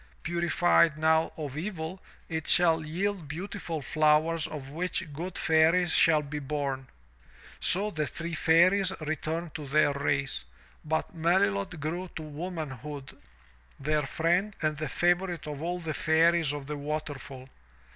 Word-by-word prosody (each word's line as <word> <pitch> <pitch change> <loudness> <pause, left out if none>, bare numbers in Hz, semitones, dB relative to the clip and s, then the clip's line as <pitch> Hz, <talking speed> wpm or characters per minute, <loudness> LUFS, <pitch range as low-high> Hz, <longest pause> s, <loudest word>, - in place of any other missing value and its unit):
Purified 170 -1 +3
now 160 +1 +3
of 145 -4 -5
evil, 175 +1 -5 0.3
it 160 -2 -4
shall 165 -2 +4
yield 180 +2 -2
beautiful 165 -1 -5
flowers 155 +2 +2
of 140 -3 -7
which 175 0 -2
good 175 +5 -5
Fairies 165 +1 +3
shall 155 -2 +4
be 150 +1 -5
bom/' 140 -2 -3 0.7
So 205 +3 +3
the 155 -4 -1
three 170 0 -5
Fairies 180 +5 +4
returned 155 +2 -3
to 150 -2 -6
their 145 +1 +3
race, 140 - -1 0.4
but 160 +5 -2
Melilot 165 - +1
grew 170 +5 -3
to 160 - -5
womanhood 150 -4 -6 0.6
their 150 +2 +1
friend 175 +8 +1
and 155 -1 +1
the 150 -1 -4
favorite 175 -1 +1
of 150 -1 -6
all 175 +2 -2
the 165 -3 -4
Fairies 165 -1 +3
of 145 -1 -5
the 150 +1 -4
waterfall. 145 -3 -5
160 Hz, 135 wpm, -29 LUFS, 150-175 Hz, 0.7 s, shall